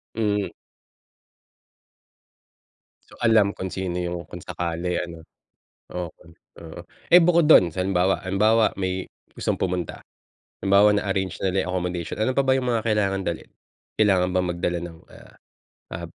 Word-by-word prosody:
Hmm. 105 -2 0 2.6
So, - - -16
alam 110 -3 +4
kung 95 0 -5
sino 95 -2 -3
yung 90 -1 -3
kung - - -9
sakali 85 +1 -3
ano. 85 -2 -9 0.6
Okay, 85 -2 -8 0.3
oo. 80 +1 -9 0.3
Eh, 175 - +10
bukod 170 -2 +4
do'n, 90 - +7
halimbawa 95 +2 +1
halimbawa 110 +4 +3
may, 95 0 -2 0.3
gustong - - -2
pumunta, 90 -3 -3 0.6
halimbawa 100 +2 +5
na-arrange 95 -2 -1
na 95 - 0
nila 95 0 0
yung - - -2
accommodation, 90 -2 -3
ano 120 +4 +1
pa 140 - +4
ba 130 - +3
yung 125 -1 -2
mga 115 -2 0
kailangang 100 -3 0
dalhin? 85 -3 -4 0.5
Kailangan 95 -4 +3
bang 90 0 +1
magdala 85 0 -2
ng 85 -1 -9
ah, - - -16 0.6
ah, 85 0 -5
95 Hz, 140 wpm, -24 LUFS, 90-105 Hz, 2.6 s, Eh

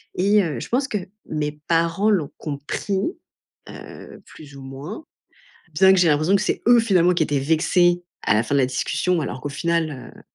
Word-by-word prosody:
et 200 +2 +3
heu, 150 -8 -3
je - - -8
pense 265 +3 0
que 215 - -2 0.3
mes 150 -1 -3
parents 170 +5 +2
l'ont 170 -9 0
compris, 150 +6 -4 0.7
heu, - - -11
plus 145 -3 -14
ou - - -11
moins, 140 - -8 0.7
bien 190 +4 +6
que 190 - +3
j'ai 175 - +4
l'impression 155 +5 +2
que - - -1
c'est - - -2
eux 240 -1 +7
finalement 185 -6 +3
qui 170 - +1
étaient 145 -1 -1
vexés 175 +4 +2 0.2
à - - +2
la 110 - +3
fin 140 - -2
de 140 - +4
la 130 - +3
discussion 135 +7 -1
alors 135 -3 -5
qu'au - - -3
final, 155 -2 -2
heu, - - -16
165 Hz, 195 wpm, -22 LUFS, 145-190 Hz, 0.7 s, eux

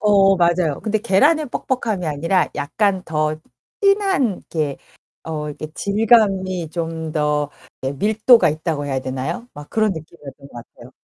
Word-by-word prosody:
어. 195 -2 +4
맞아요. 170 -3 +1
근데 220 -1 0
계란의 295 - +3
뻑뻑함이 225 -8 -2
아니라 165 +5 +1
약간 190 +6 0
더 155 -1 -1 0.4
진한 395 - +3
이렇게 150 -4 -3 0.5
어 150 -2 -4
이렇게 150 +1 -6
질감이 200 -5 +2
좀 165 -2 -4
더 150 -1 0 0.3
예 135 - -1
밀도가 215 - +4
있다고 155 -1 -3
해야 135 -1 -1
되나요? 135 - -4
막 145 0 -11
그런 215 -2 +1
느낌이었던 145 -4 -11
것 - - -22
같아요. 120 +1 -12
170 Hz, 310 characters per minute, -20 LUFS, 150-210 Hz, 0.5 s, 어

